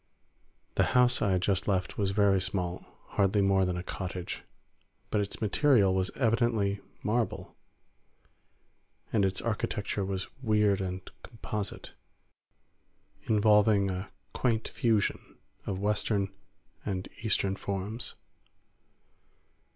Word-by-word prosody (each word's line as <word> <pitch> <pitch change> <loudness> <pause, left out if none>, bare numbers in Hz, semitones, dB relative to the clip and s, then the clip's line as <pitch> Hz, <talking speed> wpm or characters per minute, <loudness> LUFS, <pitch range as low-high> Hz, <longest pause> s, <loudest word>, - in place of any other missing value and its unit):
The - - +2
house 125 0 +4
I 105 - +2
had 90 0 +1
just 95 0 +1
left 95 -1 0
was 100 -2 +2
very 100 -1 +3
small—hardly 95 +2 -1
more 95 -1 +3
than 90 -1 -1
a 90 - -4
cottage—but 95 +3 -6
its 100 - -4
material 110 -2 +4
was 95 0 +1
evidently 115 -5 +1 0.2
marble, 115 +2 -1 1.6
and 105 - +3
its 95 0 0
architecture 105 -2 -2
was 95 -1 -3
weird 105 -4 +3
and 95 0 -4
composite, 105 -3 -6 1.3
involving 105 -2 +4
a 95 +1 -4 0.2
quaint 115 -3 0
fusion 110 -4 0 0.3
of 95 - -1
Western 105 0 0 0.5
and 95 -2 -3
Eastern 100 -3 +1
forms. 100 +4 -4
100 Hz, 105 wpm, -30 LUFS, 95-110 Hz, 1.6 s, house